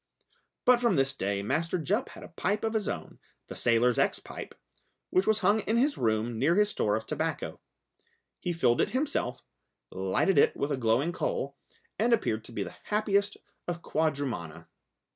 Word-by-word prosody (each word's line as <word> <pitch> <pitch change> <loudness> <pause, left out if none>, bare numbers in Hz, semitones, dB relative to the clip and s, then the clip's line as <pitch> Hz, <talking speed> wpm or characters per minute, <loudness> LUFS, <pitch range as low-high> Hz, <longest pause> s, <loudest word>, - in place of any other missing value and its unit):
But 250 -1 +6
from 235 -6 +3
this 135 -1 +2
day 100 +1 -2
Master 165 - 0
Jup 205 - 0
had - - -11
a - - -10
pipe 195 +4 -1
of 225 0 0
his 215 -3 0
own, - - -5 0.3
the - - -9
sailor's 120 +1 +3
ex - - +2
pipe, - - -9 0.6
which 185 +1 +2
was 220 0 +3
hung 205 +3 +4
in 220 +2 0
his 280 +4 +3
room 110 0 0
near 155 +7 +3
his 210 +1 +4
store 105 - +1
of 110 0 -3
tobacco. - - -3 0.8
He 180 - -2
filled 125 -8 +2
it - - +1
himself, 270 - -2 0.5
lighted 95 - +2
it - - +4
with 140 - -1
a - - +2
glowing 125 +7 +2
coal, 480 - -2 0.4
and 235 +2 +3
appeared 110 - +1
to - - -10
be 105 -3 -2
the 90 - -9
happiest 205 -1 +1 0.3
of 170 -1 -4
quadrumana. 140 - -2
165 Hz, 180 wpm, -29 LUFS, -, 0.8 s, But